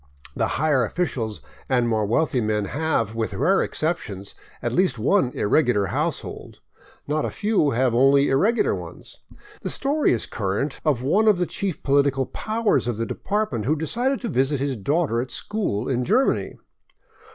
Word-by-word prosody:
The - - +1
higher 145 -2 +2
officials 115 - -2 0.3
and 125 -3 +2
more 110 -3 0
wealthy 130 +2 +1
men 105 -1 0
have, 140 -4 -1
with 110 -3 -3
rare 190 - +3
exceptions, 105 - -3 0.3
at - - -3
least 185 -6 +2
one 135 - +2
irregular 120 -2 +2
household; - - -3 0.5
not 150 +1 0
a - - -1
few 205 -8 +1
have 125 -1 +1
only 135 +3 +4
irregular 205 - +2
ones. - - -9 0.4
The - - -3
story 290 +2 +1
is 115 - +1
current 110 +8 -3
of 140 -6 +1
one 205 +11 +2
of 210 -3 +5
the 180 - +1
chief 190 -2 -4
political 140 -1 +2
pow 220 - -4
ers - - +2
of 120 -3 -2
the 115 - -1
department 200 - -2
who 150 +5 +2
decided 240 - -1
to 240 - -3
visit 135 -2 +1
his 140 -1 -1
daughter 140 - 0
at 130 - -6
school 125 - -2
in 125 -2 0
Germany. 235 - +1
140 Hz, 165 wpm, -23 LUFS, 115-180 Hz, 0.5 s, of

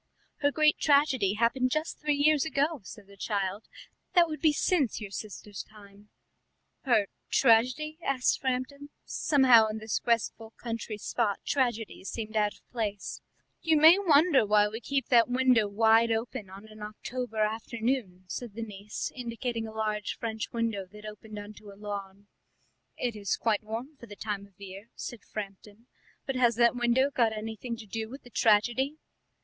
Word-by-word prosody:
"Her 285 - +2
great 305 0 +3
tragedy 275 -9 +3
happened 235 +3 +2
just 310 +5 -2
three 300 -1 +1
years 295 0 +4
ago," 310 0 0
said 200 +2 -11
the 200 0 -16
child; 200 0 -2 0.5
"that 345 -1 +6
would 310 -1 -6
be 315 -2 +5
since 295 - +1
your 205 -3 -7
sister's 205 0 -7
time." 205 -1 -17 0.8
"Her 235 -6 +4 0.2
tragedy?" 260 +6 +3
asked 260 -2 +1
Framton; 265 +2 -3 0.2
somehow 255 -6 +5
in 215 0 -4
this 220 0 -2
restful 230 -1 -1
country 230 -2 -5
spot 210 -1 -1
tragedies 235 -7 -1
seemed 220 -1 -5
out 210 -1 +1
of - - -25
place. 210 -4 -4 0.4
"You 320 -1 +3
may 320 +5 +8
wonder 315 - +5
why 210 0 +4
we 220 +2 -6
keep 275 +1 -2
that 240 -1 +5
window 250 -3 +3
wide 225 +2 +4
open 225 -2 -3
on 195 +3 -11
an 215 0 -14
October 225 +2 -6
afternoon," 220 -2 -2
said 225 +2 -6
the 230 - -4
niece, 210 -1 -6
indicating 235 -2 -4
a - - -8
large 215 -1 -2
French 220 -2 -4
window 225 -5 -2
that 210 0 -12
opened 215 0 -9
on 205 +1 -8
to 210 0 -14
a 195 - -15
lawn. 200 -1 -7 0.7
"It 240 -3 -2
is 205 -2 -1
quite 220 -3 +1
warm 230 +7 -6
for 235 - -12
the 205 - -10
time 200 -1 -4
of 200 - -30
the 200 - -9
year," 195 +4 -10
said 240 - -6
Framton; 205 +2 -8 0.4
"but 270 - -3
has 240 -2 +3
that 235 +1 +4
window 245 +3 +2
got 235 -5 +2
anything 225 +2 -5
to 225 - -10
do 220 +2 -5
with 270 +4 -10
the 245 - -15
tragedy?" 240 +7 +2
225 Hz, 170 wpm, -29 LUFS, 210-260 Hz, 0.8 s, may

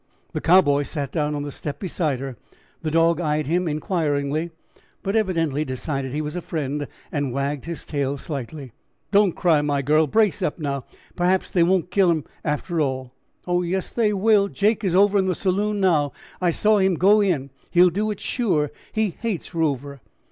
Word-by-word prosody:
The - - -2
Cowboy 165 -5 +5
sat 145 -2 -4
down 150 -1 -1
on 145 - -3
the 145 - -5
step 145 +1 -6
beside 160 -8 -1
her; 135 -2 -5 0.5
the 160 - -2
dog 165 +1 +3
eyed 150 -2 0
him 175 +5 0
inquiringly, 155 -1 -1 0.5
but 195 +2 -1
evidently 165 -9 +1
decided 135 0 -3
he 150 +3 -2
was 150 +2 -5
a 180 - -3
friend 145 -3 -3 0.2
and 145 -4 -1
wagged 140 +2 -2
his 170 -1 -6
tail 140 -2 -2
slightly. 140 -1 -6 0.4
"Don't 200 -3 +4
cry, 165 -5 +3
my 145 -1 0
girl; 155 +3 +3
brace 210 0 +2
up, - - -1
now; 140 -4 -3 0.3
perhaps 180 +1 +1
they 175 - +2
won't 180 +1 +2
kill 195 -2 +4
him 160 -3 +1 0.2
after 160 +2 -1
all." 130 -3 -2 0.3
"Oh, 175 0 +1
yes, 180 +2 -2
they 225 -3 +2
will. 205 0 +3
Jake 210 +2 +1
is 185 -3 +1
over 200 +1 +5
in 190 - +1
the 185 - +1
saloon 205 +3 0
now; 155 -7 +2 0.3
I 180 - +3
saw 210 +5 +3
him 190 -1 +3
go 205 +5 +5
in. 150 -9 0 0.2
He'll 180 0 +5
do 210 +5 -1
it 210 - -4
sure; 160 - 0 0.2
he 220 -3 0
hates 215 -6 -3
Rover." 140 -4 -2
165 Hz, 185 wpm, -23 LUFS, 145-190 Hz, 0.5 s, Cowboy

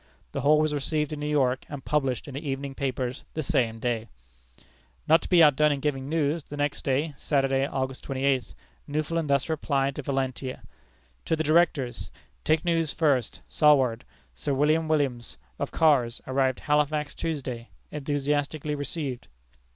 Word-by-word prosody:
The - - -3
whole 150 +2 +5
was 155 -1 +1
received 150 +1 -1
in 150 - -5
New 150 - -3
York, 130 -4 +1
and 145 -3 -7
published 135 -5 0
in 140 - -8
the 140 +4 -5
evening 135 0 -3
papers 130 -2 -3
the 155 - -1
same 125 -8 0
day. 115 -1 -2 1.0
Not 160 +2 +6
to - - -7
be 175 -3 +7
outdone 150 0 +5
in 140 - -1
giving 135 -1 -2
news, 155 0 0
the 145 - -8
next 145 0 -1
day, 145 +3 0
Saturday, 135 -1 +1
August 130 -1 -3
twenty 135 0 -4
eighth, 135 -3 +1 0.3
Newfoundland 155 +1 -1
thus 140 -1 +2
replies 140 -3 0
to 150 - -5
Valentia: 130 -1 -3 0.6
"To 160 - +1
the 160 - -1
Directors: 155 -5 +1 0.3
Take 155 +1 +2
news 165 -2 +1
first, 140 -8 +1
Saward. 135 -6 +3 0.3
Sir 140 -2 -2
William 155 +3 +2
Williams, 135 -7 -1 0.2
of - - -2
Kars, 130 -7 +3
arrived 130 -1 0
Halifax 150 0 +1
Tuesday. 130 -7 -4 0.2
Enthusiastically 145 +1 -1
received. 145 -3 -4
145 Hz, 160 wpm, -27 LUFS, 130-150 Hz, 1.0 s, be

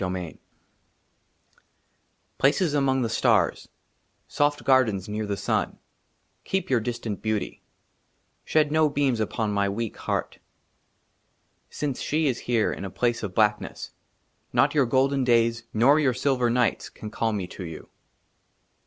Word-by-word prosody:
23 90 -2 -3
^r« - - -15
XXIII - - -26 2.0
PLACES 150 +3 +2
AMONG 135 -2 +2
THE 115 - -1
STARS, - - +1 0.6
SOFT 145 0 0
GARDENS 115 -8 +2
NEAR 105 0 -3
THE 100 -1 -2
SUN, 100 - -1 0.7
KEEP 190 -7 -2
YOUR 125 - +4
DISTANT 115 -2 -4
BEAUTY; 110 -2 -2 0.8
SHED 155 -2 +2
NO 155 0 +3
BEAMS 135 -5 0
UPON 110 0 -1
MY 100 -1 +1
WEAK 110 +2 -4
HEART. - - -3 1.3
SINCE 140 -4 -3
SHE 155 +1 0
IS 125 -3 -1
HERE 115 -3 +2
IN - - -7
A 100 - -4
PLACE 120 +4 -1
OF 100 -4 -5
BLACKNESS, 105 -1 0 0.6
NOT - - +3
YOUR 140 -4 +3
GOLDEN 135 +2 +2
DAYS 115 -1 +2
NOR 135 +7 +4
YOUR 135 -5 +2
SILVER 125 -2 +1
NIGHTS 120 0 0
CAN 105 - -9
CALL 110 0 -1
ME 100 -3 -2
TO 90 - -9
YOU. 80 -2 -9
120 Hz, 145 wpm, -25 LUFS, 105-135 Hz, 2.0 s, YOUR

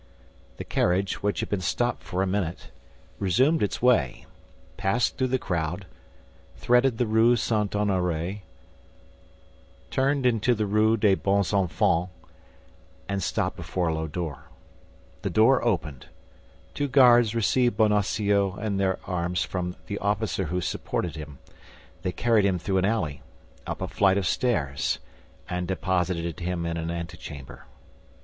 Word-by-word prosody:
The - - -5
carriage, 95 +2 0
which 105 0 0
had - - -4
been 100 -2 -1
stopped 120 +8 -1
for 95 0 -2
a - - +1
minute, 95 -8 -3 0.5
resumed 130 - +2
its 105 - -1
way, 90 - +2 0.5
passed 100 +4 0
through 130 - 0
the 130 +1 +1
crowd, 90 -3 -3 0.7
threaded 125 0 +2
the 125 - +1
Rue 110 +2 +4
St. 105 -2 0
Honoré, 95 -2 -1 1.5
turned 135 0 +1
into 120 0 +3
the 105 -1 -1
Rue 110 +2 +3
des 100 -2 +4
Bons 100 0 +1
Enfants, 90 -2 +1 1.0
and 100 -1 -2
stopped - - -1
before 90 -3 -2
a - - 0
low 80 0 -2
door. 80 -3 -5 0.8
The - - -2
door 115 +5 +4
opened; 80 - -2 0.7
two 145 - -1
guards 120 -4 +5
received 120 +1 +2
Bonacieux 100 -2 +2
in 105 -2 -2
their 95 -1 +1
arms 90 0 -1
from 90 -1 -4
the 100 - -4
officer 100 -2 -1
who 90 +3 -2
supported 85 +1 -3
him. 75 -3 -8 0.6
They 90 - -2
carried 110 +3 +2
him 95 -2 +2
through 95 +2 0
an 95 - +1
alley, 85 -10 -1 0.5
up - - -4
a - - -2
flight 95 -1 +2
of 100 - 0
stairs, 75 - 0 0.5
and 90 0 -3
deposited 90 -3 -1
him 90 -1 -2
in 85 0 -2
an 80 0 -3
antechamber. 80 -5 -7
95 Hz, 140 wpm, -26 LUFS, 90-110 Hz, 1.5 s, guards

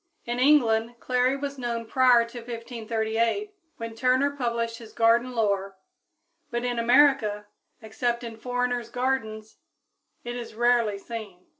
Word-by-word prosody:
In 240 +1 -3
England 240 -5 +3
clary 255 +1 +1
was 280 -1 -5
known 235 -2 -3
prior 245 0 +4
to 240 +1 -9
1538, 230 - -2 0.2
when 230 0 -6
Turner 255 +4 +2
published 235 -3 -2
his 225 -2 -12
garden 235 +2 +3
lore, 200 -3 0 0.7
but 240 +1 -2
in 245 -1 -1
America, 235 -4 +3 0.4
except 235 +2 -2
in 230 -1 -6
foreigners' 245 0 -2
gardens, 225 -4 -3 0.7
it 240 0 -5
is 235 -3 -7
rarely 235 -3 +2
seen. 200 -4 -8
235 Hz, 130 wpm, -26 LUFS, 225-250 Hz, 0.7 s, prior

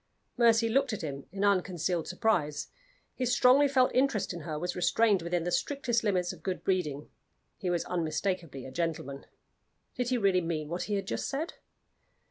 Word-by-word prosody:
Mercy 230 -2 +4
looked 270 +2 +1
at 210 - -4
him 140 -2 -5
in 200 +2 -1
unconcealed 180 -4 +1
surprise. 170 -7 0 0.4
His 255 -2 -1
strongly 255 +4 +5
felt 260 -2 +3
interest 255 -7 +1
in 175 - -6
her 155 -1 -5
was 180 +3 -3
restrained 195 +2 +3
within 170 0 -1
the 175 - -2
strictest 250 0 0
limits 185 -4 +1
of 165 - -14
good 185 +2 -3
breeding: 155 -7 -1 0.5
he 185 - -3
was 175 -1 0
unmistakably 165 -3 -2
a 130 - -8
gentleman. 150 -3 -3 0.7
Did 250 -1 -2
he 255 - +2
really 195 -4 +3
mean 160 -3 -3
what 175 +2 -3
he 205 - +1
had 195 - -2
just - - -3
said? 285 +5 -3
185 Hz, 175 wpm, -30 LUFS, 165-230 Hz, 0.7 s, strongly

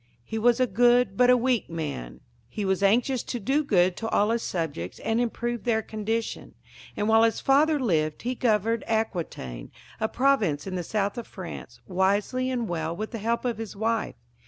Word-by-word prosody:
He 220 - -4
was 240 +2 +3
a 255 - +4
good 240 -1 +3
but 250 +4 +4
a 250 - +7
weak 245 -4 0
man. 150 - -5 0.3
He 210 - -4
was 190 0 0
anxious 240 +5 +3
to 245 - -5
do 275 +8 +1
good 185 -8 +3
to 225 - -3
all 210 0 +2
his 230 0 0
subjects 150 - -4
and 225 +2 0
improve 240 -1 -2
their 220 -2 +1
condition, 220 +2 -4 0.4
and 210 - 0
while 220 0 +5
his 225 0 +3
father 295 +3 +3
lived 155 - 0
he 250 +2 -1
governed 230 -2 +1
Aquitaine, 170 - -3 0.3
a 220 - 0
province 240 - +1
in 190 - -5
the 180 - -2
south 200 +4 -2
of 235 - -8
France, 185 -4 -9
wisely 200 +7 +1
and 245 -3 -1
well 165 -2 -2
with 215 +4 -5
the 230 - -5
help 230 +4 -1
of 235 -3 -1
his 225 -2 -6
wife. 225 +2 -1
220 Hz, 190 wpm, -26 LUFS, 190-240 Hz, 0.4 s, a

